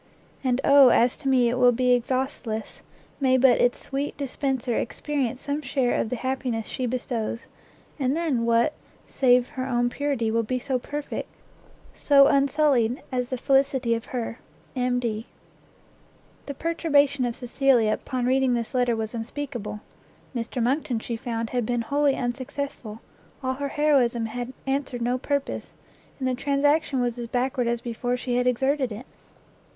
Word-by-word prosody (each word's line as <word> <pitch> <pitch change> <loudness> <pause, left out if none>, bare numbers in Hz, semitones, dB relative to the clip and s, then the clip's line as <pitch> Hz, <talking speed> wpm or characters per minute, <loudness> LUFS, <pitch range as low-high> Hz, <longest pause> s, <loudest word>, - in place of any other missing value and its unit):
And 255 -1 +1
oh 280 -2 +7
as 240 +1 +4
to 290 - -6
me 255 -2 +4
it 245 +2 0
will 250 -1 +6
be 250 +1 +1
exhaustless, 245 -2 -2 0.4
may 260 -2 +3
but 255 -1 +5
its 245 0 +3
sweet 280 +1 -4
dispenser 265 -3 -2
experience 265 -1 -2
some 285 +1 -2
share 260 -3 0
of - - 0
the 250 - -2
happiness 255 -3 -2
she 255 +3 -3
bestows, 235 -2 -3 0.5
and 270 +2 +1
then 300 -9 0
what, 235 +5 +3 0.3
save 250 -2 +3
her 260 0 -4
own 245 -1 +1
purity, 275 -6 -1
will 230 +1 +2
be 240 +3 -2
so 255 0 -1
perfect, 290 +3 -5 0.6
so 280 -1 +5
unsullied, 275 -4 +2
as 250 -1 -1
the 255 - -2
felicity 270 -2 +2
of 230 0 -3
her! 235 -2 -4 0.4
M.D. 245 -3 -1 1.2
The 280 - -5
perturbation 290 -4 +2
of 240 -1 -1
Cecilia 245 -3 +2
upon 255 -2 -3
reading 260 0 +2
this 235 +1 -3
letter 245 -2 +2
was 220 0 -4
unspeakable; 235 -2 -5 0.5
Mr 235 +1 -2
Monckton, 255 0 0
she 230 +1 -4
found, 230 -1 -4
had 245 -1 0
been 240 +1 -1
wholly 280 +3 +1
unsuccessful, 245 -2 -4 0.4
all 260 0 0
her 280 +2 -3
heroism 265 -7 +2
had 240 +2 -5
answered 270 -3 -2
no 250 +2 0
purpose, 280 +1 -3 0.4
and 260 - -2
the 255 - +1
transaction 280 +2 +1
was 245 0 -1
as 235 - -4
backward 250 +1 0
as 235 0 -1
before 245 +1 -2
she 245 0 -2
had 250 0 +1
exerted 265 +1 +1
it. 215 +5 -7
250 Hz, 155 wpm, -25 LUFS, 235-275 Hz, 1.2 s, oh